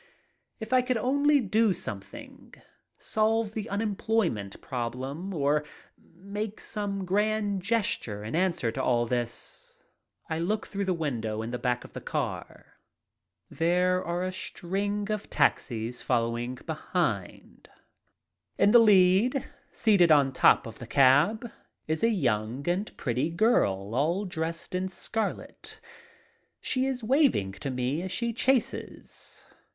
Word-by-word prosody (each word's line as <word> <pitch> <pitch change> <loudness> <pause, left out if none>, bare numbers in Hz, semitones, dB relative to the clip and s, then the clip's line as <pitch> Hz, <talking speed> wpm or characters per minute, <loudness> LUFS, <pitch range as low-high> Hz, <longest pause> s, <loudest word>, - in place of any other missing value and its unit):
If 220 +2 -5
I 255 - +6
could 250 -1 0
only 285 +5 +3
do 215 -1 +2
something. 100 - -9 0.4
Solve 220 0 0
the 220 0 -4
unemployment 200 - -1
problem 130 +8 -4
or 150 -3 +1 0.4
make 200 +5 -7
some 200 -3 -3
grand 205 +1 0
gesture, 185 - -1
in 110 +7 -4
answer 170 -10 +1
to - - -3
all 120 -1 +2
this. 120 -1 -4 0.5
I 160 - -2
look 205 +6 -1
through 200 0 -3
the 185 -1 +1
window 115 -9 -2
in 115 - -5
the 125 - -3
back 125 0 -1
of - - -13
the - - -7
car. - - -5 0.7
There 180 +2 +1
are 175 +1 -2
a 185 - -2
string 200 +3 -3
of 215 -1 -3
taxis 115 0 0
following 120 0 -1
behind. 155 - -3 0.9
In 205 - +4
the 240 - +8
lead, 210 +4 +4 0.3
seated 195 -7 +4
on 140 -3 +5
top - - +5
of 115 -1 -9
the 120 - -8
cab, 145 - +4 0.4
is 160 +4 -1
a 230 - +5
young 125 - -1
and 185 +5 -1
pretty 130 +4 -1
girl 115 - +1
all 165 - +1
dressed 165 -2 -4
in 185 +1 -1
scarlet. 215 +3 -5 0.8
She 260 0 0
is 255 -3 -3
waving 255 - +3
to 100 +8 -6
me 130 +4 -1
as 185 0 -5
she 235 +3 -1
chases. 255 +1 -2
180 Hz, 135 wpm, -28 LUFS, 125-215 Hz, 0.9 s, the